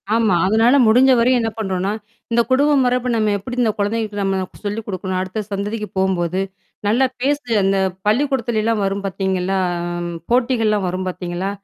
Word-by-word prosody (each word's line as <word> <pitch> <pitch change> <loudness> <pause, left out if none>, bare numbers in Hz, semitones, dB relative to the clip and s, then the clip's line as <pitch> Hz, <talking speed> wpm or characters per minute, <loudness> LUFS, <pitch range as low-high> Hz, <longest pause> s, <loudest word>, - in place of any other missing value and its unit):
ஆமா. 220 -6 +3
அதனால 225 +6 +4
முடிஞ்ச 255 +4 +5
வரையும் 245 +1 +3
என்ன 225 - 0
பண்ணறோன்னா, 190 -2 -1 0.4
இந்த 235 0 +4
குடும்பம் 280 +1 +4
மரபு 250 0 +1
நம்ம 215 -2 +1
எப்பிடி 245 +5 -7
இந்த 220 - +2
குழந்தைகளுக்கு 205 0 -1
நம்ம 195 -1 0 0.2
சொல்லிக் 210 +2 -3
குடுக்கணும் 185 -1 -3
அடுத்த 190 +3 -4
சந்ததிக்கு 210 +2 -3
போம்போது, 185 -1 0 0.5
நல்லா 245 +5 +3 0.2
பேசு, 285 0 0 0.2
அந்த 195 0 +2 0.3
பள்ளிக்கூடத்துலயிலாம் 230 -3 +1
வரும் 195 +1 -2
பார்த்தீங்களா? 190 0 -1 0.7
போட்டிகள்லாம் 230 -5 +2
வரும் 185 +1 -3
பார்த்தீங்களா? 180 +1 -3
210 Hz, 145 wpm, -19 LUFS, 190-235 Hz, 0.7 s, முடிஞ்ச